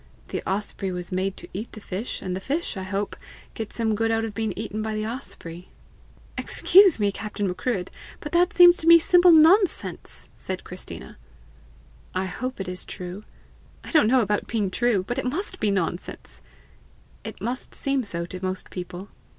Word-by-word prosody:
The - - -3
osprey 195 -1 -2
was 180 0 -5
made 190 +1 -1
to - - -8
eat 210 +5 -6
the 215 - -8
fish, 200 +3 -5
and 185 -1 -2
the - - -3
fish, 290 - -2
I 190 - -4
hope, 195 +2 -3 0.4
get 220 -2 -5
some 225 -2 0
good 225 +2 +1
of 225 -1 0
being 220 0 -1
eaten 215 0 -4
by 220 0 -2
the 215 0 -2
osprey." 180 -7 -7 0.7
"Excuse 380 - +5
me, 205 -1 +2
Captain 205 0 -3
Macruadh, 185 +1 -2 0.3
but 295 - -7
that 350 +1 +3
seems 350 0 +8
to 320 - -4
me 335 0 +10
simple 355 +1 +6
nonsense!" 335 +5 +3
said - - -5
Christina. - - -8 1.0
"I 185 +1 0
hope 255 +7 -4
it 195 - -4
is 180 0 -4
true." 180 +3 -7 0.6
"I - - -8
don't 310 -10 +5
know 255 +2 +5
about 210 -1 0
being 210 -4 -1
true, 235 -3 +1
but 245 +5 -2
it - - -3
must 325 +11 -3
be 215 - +1
nonsense." 185 -2 -3 0.8
"It - - -7
must 250 +3 -4
seem 275 -1 0
so 170 -5 -4
to 185 +1 -8
most 185 0 -3
people." 180 +1 -7
215 Hz, 180 wpm, -25 LUFS, 190-260 Hz, 1.0 s, me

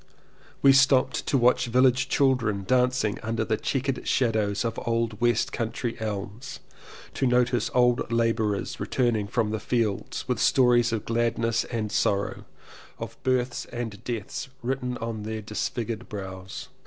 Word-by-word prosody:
We 135 -1 +8
stopped 135 -1 +3
to 140 - +2
watch 125 0 +3
village 125 +1 +3
children 120 -8 +2
dancing 125 -4 +2
under 110 0 -1
the 110 - +1
chequered 135 +3 -2
shadows 110 -4 +1
of 115 0 -2
old 115 -2 -1
west 120 +1 +2
country 115 0 -3
elms 105 +5 -5 0.3
— - - -17
to 135 - 0
notice 125 -1 +2
old 125 -1 +3
labourers 115 -3 0
returning 115 -5 0
from 110 0 0
the 110 - -2
fields 110 -3 -2
with - - -1
stories 120 -2 +4
of 115 -2 -2
gladness 115 0 0
and 110 -3 -3
sorrow, 100 -1 0 0.5
of - - -7
births 125 -1 0
and 115 -3 -6
deaths 120 +2 -4
written 125 0 -2
on 115 -1 -4
their 110 0 -5
disfigured 115 +2 -4
brows. 95 -2 -7
115 Hz, 140 wpm, -26 LUFS, 110-125 Hz, 0.5 s, We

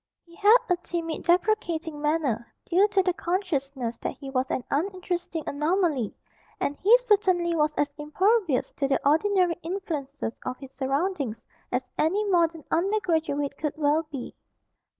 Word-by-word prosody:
He 340 0 -18
had 420 +5 +7
a 360 - +2
timid 335 -2 -4
deprecating 345 -4 +1
manner, 295 -7 0 0.2
due 375 +4 +4
to 400 -2 +2
the 365 -1 +1
consciousness 280 - -2
that - - -4
he 275 -2 -8
was 260 0 0
an 255 - -1
uninteresting 350 0 -2
anomaly, 300 - 0 0.4
and 285 - -1
he 440 +6 +6
certainly 385 -8 +2
was 300 -1 +1
as 290 0 0
impervious 365 - +1
to 275 - +1
the 270 - +2
ordinary 355 +2 +3
influences 305 - -4
of 255 0 -4
his 270 -1 -11
surroundings 275 - -2 0.3
as 255 +1 -1
any 385 +7 +2
modern 335 -3 +2
under 390 +6 +2
graduate 305 -6 -1
could 300 -3 -1
well 305 +1 +2
be. 270 -4 -6
325 Hz, 150 wpm, -26 LUFS, 280-370 Hz, 0.4 s, had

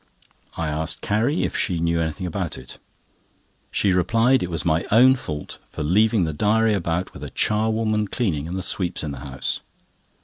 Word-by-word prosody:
I 85 - -1
asked 80 +1 -2
Carrie 115 +10 +1
if - - -2
she 90 -5 0
knew 85 0 +1
anything 80 +3 -3
about 90 -1 -3
it. 65 -1 -11 0.9
She 100 -3 +1
replied 115 +8 +3
it 90 - -2
was 85 -1 -3
my 80 0 +2
own 125 +5 +7
fault 75 - -6
for - - -5
leaving 105 +5 +3
the 80 -2 -1
diary 110 +6 +2
about 90 -2 -1
with - - -9
a - - -5
charwoman 110 0 +1
cleaning 85 - -1
and 90 +3 -4
the 95 - -2
sweeps 90 -2 -1
in 75 - -3
the 70 - -7
house. 65 0 -4
90 Hz, 180 wpm, -23 LUFS, 80-110 Hz, 0.9 s, own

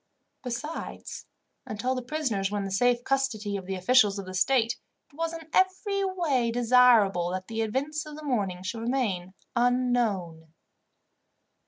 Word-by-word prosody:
Besides, 260 +6 -6 0.4
until 215 +5 -2
the 255 - -3
prisoners 245 -8 -1
were 205 - -2
in 200 - -1
the 195 - -5
safe 245 +4 +2
custody 245 -7 -1
of 190 -2 -5
the 195 - -2
officials 205 +1 +4
of 200 - -5
the 185 - -8
state, 230 +4 +2 0.3
it - - -21
was 330 +1 -2
in 325 -1 -8
every 390 +2 +2
way 330 -11 0
desirable 230 -7 +4
that 185 0 -4
the 225 0 -3
events 280 +8 -2
of 300 - -8
the 310 - -10
morning 200 -10 -1
should 225 +4 -4
remain 210 -7 -1 0.2
unknown. 235 -10 0
240 Hz, 155 wpm, -27 LUFS, 200-270 Hz, 0.4 s, officials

